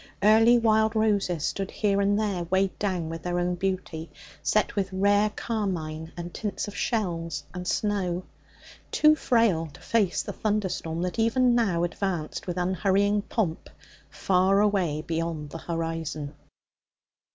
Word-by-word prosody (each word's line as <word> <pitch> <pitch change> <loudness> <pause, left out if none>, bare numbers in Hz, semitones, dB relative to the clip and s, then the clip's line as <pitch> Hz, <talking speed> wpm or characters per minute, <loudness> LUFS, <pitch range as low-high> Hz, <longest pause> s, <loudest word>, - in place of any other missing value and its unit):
Early 225 +3 +6
wild 220 -1 +3
roses 200 -7 +1
stood 195 -1 -2
here 200 -2 +1
and 200 +1 +2
there, 195 -5 -1
weighed 190 +2 0
down 185 -5 -1
with 165 0 -6
their 175 0 -2
own 175 0 0
beauty, 175 -3 -3 0.3
set 215 +1 +1
with 195 -2 -1
rare 205 +2 +3
carmine 170 -8 -3
and 175 0 -6
tints 210 0 -3
of 205 - -8
shells 165 - -2
and 180 0 -6
snow, 185 -4 0 0.7
too 305 0 +5
frail 230 - +2
to 145 - -15
face 210 -6 +1
the - - -6
thunderstorm 190 -6 -2
that 180 +5 -3
even 245 +2 +3
now 200 -8 +2
advanced 175 -3 -3
with 175 0 -3
unhurrying 195 +3 +2
pomp 195 -6 -2 0.4
far 190 +1 +2
away 185 -8 +1
beyond 165 -3 -3
the 165 - -6
horizon. 165 -3 -4
190 Hz, 140 wpm, -26 LUFS, 170-210 Hz, 0.7 s, Early